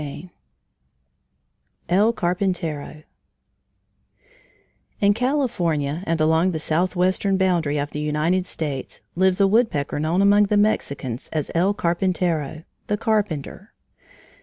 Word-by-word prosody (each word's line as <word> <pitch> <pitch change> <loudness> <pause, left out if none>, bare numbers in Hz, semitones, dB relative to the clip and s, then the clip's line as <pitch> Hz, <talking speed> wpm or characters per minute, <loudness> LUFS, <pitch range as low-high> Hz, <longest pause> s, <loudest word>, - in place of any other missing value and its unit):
VIII 150 +4 -8 1.6
EL 200 +6 +3
CARPINTERO 175 -6 -2 2.0
In 200 0 +4
California 180 - -1
and 165 0 0
along 160 +3 +3
the - - -1
southwestern 185 +4 +1
boundary 175 -6 +1
of 145 0 -3
the 150 - -5
United 155 +5 0
States 145 -5 -5
lives 185 +1 +2
a 200 - +5
woodpecker 195 - +1
known 165 +6 +1
among 205 +1 +5
the 205 +1 +1
Mexicans 140 - -1
as 155 -3 -2
El 185 +5 +2
Carpintero, 170 -4 -1 0.2
the 210 - 0
Carpenter. 205 -3 -2
175 Hz, 110 wpm, -22 LUFS, 155-195 Hz, 2.0 s, a